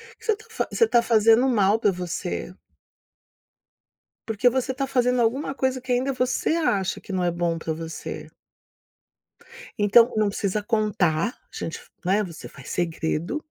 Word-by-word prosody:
O - - -54
que - - -17
você 450 - +3
está 445 +2 -3
Você - - +2
está 240 - +3
fazendo 225 +2 +4
mal 210 -3 +3
para 210 -3 +3
você. 180 0 -4 1.7
Porque 225 +2 +3
você 260 +1 -1
está 270 +1 -2
fazendo 250 -1 +2
alguma 265 +4 0
coisa 260 -1 0
que 255 0 -5
ainda 255 +3 +1
você 255 0 0
acha 200 - 0
que - - -10
não 185 -1 0
é 175 - +1
bom 170 -1 -1
pra 160 0 -3
você. 165 +1 -7 1.5
Então, 230 +3 +5
não 215 -1 +2
precisa 200 +1 -2
contar, 205 -8 +1
a - - -12 0.2
gente 165 - -4
f - - -19 0.2
né, 200 +4 +2
você 170 -4 -8
faz 135 - -12
segredo, 170 - -2
215 Hz, 165 wpm, -24 LUFS, 180-250 Hz, 1.7 s, Então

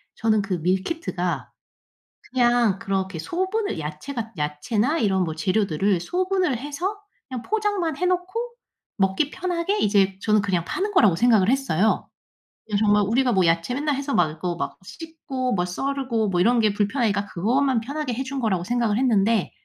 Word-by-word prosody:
저는 220 -1 +2
그 195 -2 -2
밀키트가 185 - -2 0.8
그냥 240 -5 +3
그렇게 190 -3 -2
소분을 375 - -2
야채가 220 - -5
야채나 210 - 0
이런 190 - +2
뭐 160 -2 -3
재료들을 185 +2 +1
소분을 365 - 0
해서 295 - -3 0.3
그냥 255 -3 -5
포장만 410 - -1
해 360 - +1
놓고 370 +7 -1 0.5
먹기 195 +8 +1
편하게 365 +3 -1
이제 195 - +2
저는 215 -1 +3
그냥 185 -4 0
파는 390 - -2
거라고 210 - +5
생각을 220 -3 +4
했어요. 235 -7 +1 0.6
예. 205 - +2
정말 210 0 +3
우리가 245 +4 +2
뭐 190 -3 +3
야채 165 +7 +1
맨날 290 +2 0
해서 280 +1 -3
막 155 - +3
이거 170 +3 -4
막 - - -4
씻고 270 - -5
뭐 180 -2 0
썰고 240 +2 -1
뭐 180 -2 0
이런 235 +6 +4
게 215 -2 +3
불편하니까 205 0 0
그것만 245 +7 +1
편하게 280 +2 -3
해 255 +3 -2
준 270 +1 -4
거라고 200 -8 0
생각을 230 0 0
했는데 225 -4 +2
225 Hz, 340 characters per minute, -23 LUFS, 190-280 Hz, 0.8 s, 거라고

